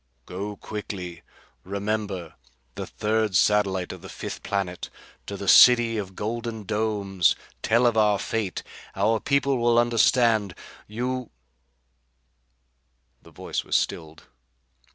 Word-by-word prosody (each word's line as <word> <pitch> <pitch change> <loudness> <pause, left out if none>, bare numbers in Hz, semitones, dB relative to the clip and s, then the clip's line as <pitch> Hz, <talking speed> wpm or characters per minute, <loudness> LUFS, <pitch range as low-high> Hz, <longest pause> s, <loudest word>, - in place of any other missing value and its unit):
Go 100 +3 -5
quickly. 95 -5 -7 0.4
Remember 100 -3 -3 0.4
the - - -6
third 110 -2 -1
satellite 95 -2 +2
of - - -9
the - - -10
fifth - - -7
planet 95 -3 -3 0.4
to 100 - -5
the 100 - -6
city 115 +3 +7
of 95 -2 -7
golden 115 +1 -4
domes. 100 -4 +1 0.3
Tell 115 +3 +3
of 120 -2 +3
our 105 -2 +3
fate. 105 -2 -3 0.3
Our 110 +3 +2
people 140 +1 +1
will 120 0 +3
understand. 115 -4 +3 0.3
You 125 +3 -3 1.3
" 60 0 -46
The - - -17
voice - - -4
was - - -2
stilled. 80 -1 -2
105 Hz, 120 wpm, -25 LUFS, 95-115 Hz, 1.3 s, city